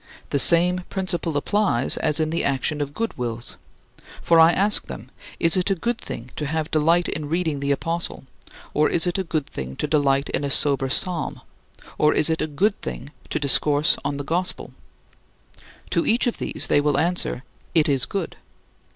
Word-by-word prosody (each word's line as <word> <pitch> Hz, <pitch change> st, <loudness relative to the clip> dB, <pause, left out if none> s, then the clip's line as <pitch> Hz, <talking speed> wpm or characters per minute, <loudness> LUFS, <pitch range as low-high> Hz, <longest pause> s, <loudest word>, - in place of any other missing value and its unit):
The 140 Hz, -, +1 dB
same 175 Hz, +5 st, +6 dB
principle 180 Hz, -5 st, -3 dB
applies 165 Hz, -, +1 dB
as 150 Hz, 0 st, 0 dB
in 155 Hz, 0 st, -1 dB
the 165 Hz, -, -1 dB
action 140 Hz, +2 st, -1 dB
of 145 Hz, 0 st, -5 dB
good 230 Hz, 0 st, -3 dB
wills. 120 Hz, -1 st, -4 dB, 0.7 s
For 165 Hz, -1 st, +4 dB
I 165 Hz, +1 st, +7 dB
ask 205 Hz, +4 st, +5 dB
them, -, -, -10 dB, 0.3 s
"Is 165 Hz, -1 st, +4 dB
it 185 Hz, +1 st, 0 dB
a 195 Hz, -, +1 dB
good 235 Hz, +6 st, -3 dB
thing 120 Hz, +2 st, -8 dB
to 150 Hz, -, -3 dB
have 160 Hz, +1 st, -3 dB
delight 165 Hz, +3 st, +2 dB
in 150 Hz, -1 st, -4 dB
reading 160 Hz, -3 st, -1 dB
the 140 Hz, 0 st, -3 dB
apostle, 165 Hz, +4 st, -3 dB, 0.5 s
or 150 Hz, +1 st, +2 dB
is 170 Hz, -, +2 dB
it 175 Hz, +2 st, -1 dB
a -, -, -1 dB
good 155 Hz, -4 st, -3 dB
thing 65 Hz, -, -7 dB
to -, -, -3 dB
delight 140 Hz, -2 st, +1 dB
in -, -, -2 dB
a 140 Hz, -, -2 dB
sober 135 Hz, -1 st, +2 dB
psalm, 175 Hz, +4 st, -2 dB, 0.6 s
or 150 Hz, -, +3 dB
is 155 Hz, +2 st, +5 dB
it 160 Hz, -, -1 dB
a -, -, -1 dB
good 195 Hz, +8 st, -1 dB
thing -, -, -7 dB, 0.2 s
to -, -, -2 dB
discourse 145 Hz, +2 st, +2 dB
on 140 Hz, 0 st, -3 dB
the 145 Hz, -, -5 dB
gospel?" 175 Hz, +5 st, -3 dB, 1.2 s
To -, -, +1 dB
each 230 Hz, +2 st, +2 dB
of 240 Hz, -, -2 dB
these, -, -, -3 dB
they 145 Hz, -, +3 dB
will 145 Hz, -1 st, 0 dB
answer, 170 Hz, -4 st, 0 dB, 0.3 s
"It 160 Hz, -2 st, +4 dB
is 135 Hz, -4 st, +1 dB
good." 195 Hz, -4 st, -5 dB
155 Hz, 190 wpm, -22 LUFS, 140-175 Hz, 1.2 s, I